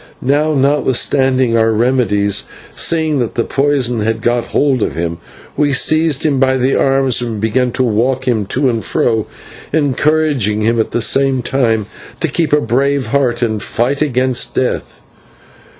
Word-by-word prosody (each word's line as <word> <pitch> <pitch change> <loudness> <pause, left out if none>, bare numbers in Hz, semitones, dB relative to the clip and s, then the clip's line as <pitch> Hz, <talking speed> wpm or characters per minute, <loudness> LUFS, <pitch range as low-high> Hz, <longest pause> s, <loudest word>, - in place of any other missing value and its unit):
Now, 150 +4 +1
notwithstanding 130 -2 +1
our 115 0 +2
remedies, 110 -4 +1 0.3
seeing 160 -3 +1
that 120 -3 -3
the 115 - 0
poison 135 -4 0
had 110 +1 -2
got 120 0 0
hold 135 -4 0
of - - -2
him, 85 0 -3 0.4
we 145 -1 +1
seized 155 +1 +2
him 140 -4 +1
by 130 0 +2
the 130 +1 +1
arms 135 -2 +2
and 115 -3 -4
began 120 +4 0
to 130 - 0
walk 125 +3 0
him 110 -5 0
to 135 +5 0
and 115 -3 -1
fro, 110 -3 0 0.4
encouraging 145 -6 +1
him 115 +2 +1
at 110 - 0
the 120 - -2
same 135 0 +1
time 115 -5 0 0.3
to 165 - 0
keep 160 +2 -1
a 150 - +4
brave 135 -1 0
heart 125 -2 0
and 110 -3 -1
fight 130 +7 -1
against 130 -3 0
death. 130 - -3
130 Hz, 160 wpm, -15 LUFS, 115-140 Hz, 0.4 s, a